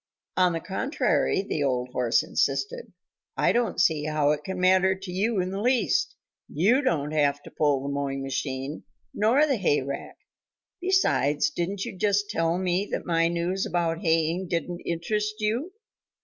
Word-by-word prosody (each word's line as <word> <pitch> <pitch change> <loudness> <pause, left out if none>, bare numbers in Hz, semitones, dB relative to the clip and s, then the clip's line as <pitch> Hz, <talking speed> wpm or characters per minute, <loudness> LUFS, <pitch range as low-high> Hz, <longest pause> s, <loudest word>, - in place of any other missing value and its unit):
"On 180 -1 +3
the 165 - -1
contrary," 195 - 0
the 155 -7 -2
old 125 -2 0
horse 125 -1 +1
insisted, 475 +3 -1 0.5
"I - - +3
don't 240 -1 0
see 155 -4 +2
how 155 -1 +2
it 150 - -2
can 190 -1 -5
matter 190 +1 +4
to 190 -1 -8
you 205 +3 0
in 185 0 -1
the 195 +1 -3
least. 255 - +1 0.3
You 215 - +3
don't 155 - 0
have 145 -2 +1
to - - -12
pull 145 -3 +1
the 140 - -3
mowing 135 -1 -2
machine 135 +1 -4 0.3
nor 240 +8 +3
the 275 -5 +1
hayrake. 140 -7 -1 0.7
Besides, 345 - +2
didn't 190 +3 -3
you - - -6
just 205 +1 +1
tell 165 +1 +1
me 185 +2 0
that - - -3
my 165 -1 +2
news 175 +3 -1
about 170 -1 -1
haying 165 +1 +1
didn't 175 +1 -3
interest 210 +5 -1
you?" 230 - -1
175 Hz, 165 wpm, -26 LUFS, 150-205 Hz, 0.7 s, matter